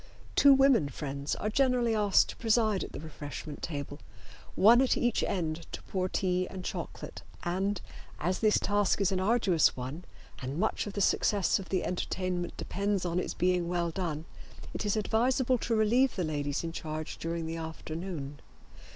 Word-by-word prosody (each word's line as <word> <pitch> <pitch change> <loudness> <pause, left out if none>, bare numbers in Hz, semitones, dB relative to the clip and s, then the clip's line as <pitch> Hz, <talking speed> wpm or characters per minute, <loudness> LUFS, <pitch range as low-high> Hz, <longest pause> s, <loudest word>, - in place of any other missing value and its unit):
Two 280 - +7
women 270 - +5
friends 140 -1 -4
are - - -3
generally 250 -2 +2
asked 205 -3 +4
to - - -6
preside 220 -3 +2
at - - -7
the - - -7
refreshment 150 -1 -7
table, 145 -2 -5 0.6
one 230 +5 +7
at 265 - +2
each 240 -1 +1
end 165 -3 -2
to - - -7
pour 185 -1 -2
tea 185 -1 0
and 185 -1 -7
chocolate, - - -6 0.2
and, 190 +3 -1 0.4
as 180 +4 0
this 215 -2 +4
task 205 -1 +1
is 195 -1 +2
an 190 - 0
arduous 190 - +3
one 130 +7 -5 0.4
and 135 +3 -4
much 215 +2 0
of 205 - -6
the 200 - -2
success 200 0 +2
of 195 - -9
the 185 -2 0
entertainment 180 -1 -2
depends 200 -1 -1
on 175 0 0
its - - -3
being 180 -1 +1
well 170 -1 0
done, 160 -3 -3 0.5
it 210 - -3
is 205 - +1
advisable 245 +4 +2
to 230 - 0
relieve 235 +5 +3
the 185 - -1
ladies 145 -2 -2
in 165 - -3
charge 155 -1 -5
during 165 0 -3
the 165 +1 -4
afternoon. 160 -2 -6
185 Hz, 175 wpm, -30 LUFS, 160-215 Hz, 0.6 s, Two